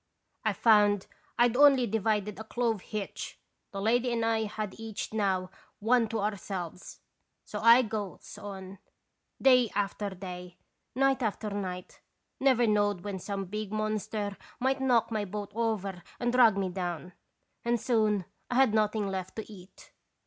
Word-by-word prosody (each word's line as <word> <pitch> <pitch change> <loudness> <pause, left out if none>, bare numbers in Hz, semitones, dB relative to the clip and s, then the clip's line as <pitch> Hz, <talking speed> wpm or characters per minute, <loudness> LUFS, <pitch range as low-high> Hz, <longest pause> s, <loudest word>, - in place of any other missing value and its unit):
I - - +1
found 205 -3 +4 0.3
I'd 240 0 +4
only 275 -2 +6
divided 210 -1 0
a - - -5
clove 225 -2 -1
hitch, 210 0 -6 0.3
the 195 - -6
lady 240 +4 +2
and 230 -1 0
I 225 -1 +1
had 210 -1 -4
each 220 -1 -5
now 190 -4 0 0.3
one 230 +2 +3
to 220 -1 -2
ourselves. 190 -4 -5 0.4
So - - -5
I 235 +2 +7
goes 215 -4 -5
on, 195 -1 -8 0.6
day 250 -3 +5
after 205 0 -1
day, 180 -2 -8 0.4
night 270 0 +3
after 215 -1 -2
night, 185 -3 -5 0.4
never 260 -3 +4
knowed 205 -3 +2
when 200 -2 -4
some 195 +1 -4
big 210 +2 -5
monster 215 -1 -2 0.2
might 265 +1 +1
knock 245 -4 +3
my 215 -2 0
boat 205 +1 -5
over 205 -5 -1 0.2
and 240 0 0
drag 235 -5 +6
me 195 -1 0
down, 180 -1 -4 0.5
and 235 0 +1
soon 215 -4 +1 0.2
I 245 - -2
had 260 -4 +5
nothing 215 -1 +1
left 190 -1 -4
to 220 -1 -7
eat. 185 -1 -15
210 Hz, 150 wpm, -29 LUFS, 195-230 Hz, 0.6 s, I